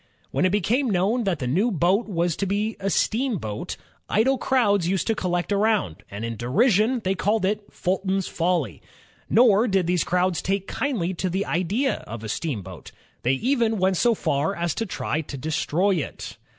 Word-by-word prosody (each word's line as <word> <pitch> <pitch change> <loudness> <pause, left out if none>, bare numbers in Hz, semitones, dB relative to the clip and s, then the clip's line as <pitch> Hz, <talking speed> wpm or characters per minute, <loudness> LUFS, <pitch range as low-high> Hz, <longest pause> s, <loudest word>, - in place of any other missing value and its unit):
When - - +1
it 185 - +3
became 230 +7 +1
known 210 +5 +1
that 190 -3 +1
the 135 - -4
new 180 - +2
boat 190 +3 +1
was 170 -4 0
to 200 - -1
be 210 +3 -1
a 195 0 -1
steamboat, 200 - -1 0.3
idle 255 +5 +2
crowds 205 -10 +2
used 190 0 0
to 225 - +2
collect 175 -2 -2
around, 200 - +1
and 100 +3 -5
in 115 -1 -4
derision 215 - +2
they 190 - +1
called 205 +1 0
it 205 +1 -1
"Fulton's 190 +1 -1
Folly." 165 - -1 0.5
Nor 225 -1 +5
did 190 -4 +2
these 175 0 +1
crowds 180 0 +1
take 195 0 -1
kindly 205 -11 -2
to 185 +1 -2
the 190 +3 -1
idea 200 +11 0
of 115 0 -7
a 110 - -5
steamboat; 100 - -5 0.3
they 125 - +2
even 230 - +1
went 190 0 +2
so 235 +3 +3
far 150 +3 0
as 170 -2 -1
to 225 - -3
try 160 -3 -2
to 145 -2 -8
destroy 160 +6 0
it. 155 - -5
190 Hz, 180 wpm, -24 LUFS, 170-215 Hz, 0.5 s, Nor